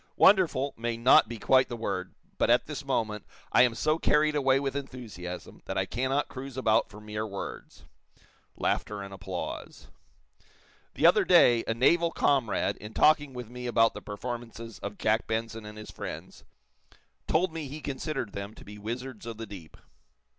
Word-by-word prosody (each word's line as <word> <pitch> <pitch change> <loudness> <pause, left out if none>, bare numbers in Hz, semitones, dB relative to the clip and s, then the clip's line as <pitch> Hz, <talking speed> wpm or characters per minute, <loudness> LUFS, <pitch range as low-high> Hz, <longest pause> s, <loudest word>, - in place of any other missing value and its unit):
'Wonderful' 170 -8 +4
may 115 0 -3
not 115 -2 +6
be 120 - -5
quite 130 +4 +4
the 120 - -4
word, 95 -5 -3 0.2
but, - - +3
at - - +4
this - - -6
moment, 105 -2 -1 0.3
I - - +6
am 120 -2 +4
so 155 +6 +1
carried 150 0 +3
away 135 -2 +3
with 135 -1 -2
enthusiasm 110 -11 -7
that - - -4
I - - +1
cannot 130 +4 -1
cruise 135 0 -8
about 110 -4 +2
for 105 +1 -12
mere 105 0 -4
words." 100 -2 -8 0.7
(Laughter 105 -1 -1
and 100 0 -9
applause.) 95 -2 -6 1.1
"The - - +1
other - - +7
day, 120 -1 +6
a 115 - 0
naval 170 +8 +4
comrade, 135 -7 +1
in 105 +1 -10
talking 145 -2 +4
with 125 -3 -8
me 125 0 -6
about 115 -1 +4
the - - -8
performances 115 +1 -7
of 100 0 -6
Jack 110 +1 +1
Benson 115 -1 -3
and 105 0 -10
his 105 - -9
friends, - - -8 0.8
told 170 +1 +2
me 155 -4 -5
be 150 +3 -6
considered 135 -5 -4
them 100 +2 -6
to - - -13
be 105 0 -10
wizards 120 +2 -6
of 115 -2 -6
the 115 - -5
deep." 95 -6 -11
115 Hz, 175 wpm, -28 LUFS, 105-135 Hz, 1.1 s, other